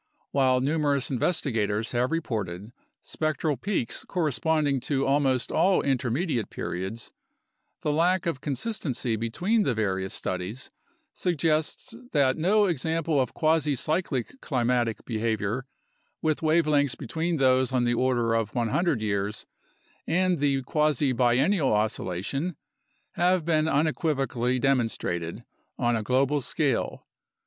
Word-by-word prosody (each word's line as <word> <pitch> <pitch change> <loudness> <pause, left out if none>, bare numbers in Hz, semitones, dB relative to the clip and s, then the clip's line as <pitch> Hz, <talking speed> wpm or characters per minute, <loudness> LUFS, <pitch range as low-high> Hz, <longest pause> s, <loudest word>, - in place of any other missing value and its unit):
While 130 -2 +3
numerous 145 -1 +1
investigators 115 - 0
have 125 +1 0
reported 105 - -3 0.3
spectral 155 -1 -1
peaks 175 - -2
corresponding 155 -3 0
to 135 +1 -1
almost 135 -2 +1
all 190 +1 +3
intermediate 130 - 0
periods, 95 +6 -5 0.7
the 150 - +1
lack 175 +4 +2
of 165 -6 -2
consistency 140 - -2
between 175 - 0
the 135 - +1
various 95 -3 -1
studies 95 +8 -4 0.4
suggests 160 - -1 0.2
that 140 -4 +3
no 205 +6 +3
example 165 -3 0
of 125 - -3
quasi 155 -2 +2
cyclic 155 - -2
climatic 120 -4 0
be 115 - -3
havior 110 +2 -1 0.5
with 155 -1 0
wavelengths 155 -4 +2
between 160 +5 -2
those 130 -1 +3
on 125 -2 +1
the 120 0 +2
order 120 -2 +1
of 115 -1 -1
100 120 - +1
years 100 0 -2 0.6
and 180 0 +2
the 140 -2 +1
quasi 150 -1 +1
biennial 130 +6 +2
oscillation 110 - -1 0.6
have 180 -1 +2
been 155 -2 +2
unequivocally 140 -5 0
demonstrated 115 -10 -1 0.3
on 120 0 +1
a 110 - -1
global 135 +5 +1
scale. 135 -1 -1
135 Hz, 120 wpm, -26 LUFS, 120-160 Hz, 0.7 s, While